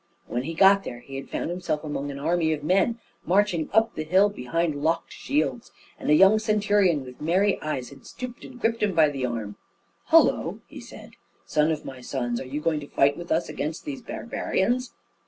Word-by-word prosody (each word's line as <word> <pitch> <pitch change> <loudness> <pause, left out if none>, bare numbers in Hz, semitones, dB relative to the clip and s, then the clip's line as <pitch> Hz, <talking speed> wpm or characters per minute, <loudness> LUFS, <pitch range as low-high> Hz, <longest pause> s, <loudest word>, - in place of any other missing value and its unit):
When 120 - -2
he 160 +5 -5
got 195 +3 +6
there, 120 - -6
he 135 +2 -10
had 135 - -8
found - - -3
himself 175 -4 -2
among 145 -2 -4
an 140 - -6
army 160 +2 +1
of 150 -1 -5
men 195 +8 +2 0.3
marching 185 -3 +1
up 220 +2 +3
the 155 - -4
hill 190 +6 +4
behind 165 -2 -2
locked 165 +3 0
shields, 280 -4 -2 0.3
and - - -4
a 150 - +6
young 195 +6 +6
centurion 205 - +2
with 125 0 -12
merry 190 +6 +2
eyes 130 -5 -3
had 135 -1 -14
stooped 250 -1 -8
and 250 -1 -11
gripped 230 0 0
him 205 -4 +1
by 155 -2 +5
the 135 -3 -2
arm. 110 -4 -5 0.5
"Hullo!" - - +4
he - - -11
said; - - -12 0.3
"son 150 +1 +2
of 155 -2 -2
my 130 -2 -8
sons, 120 -2 -3
are - - -6
you 140 +3 -3
going 155 -1 0
to 145 - -9
fight 140 0 +3
with 175 +2 -8
us 165 +2 +1
against 155 +3 -4
these 280 -4 -5
barbarians?" 235 +1 -2
165 Hz, 205 wpm, -25 LUFS, 145-205 Hz, 0.5 s, got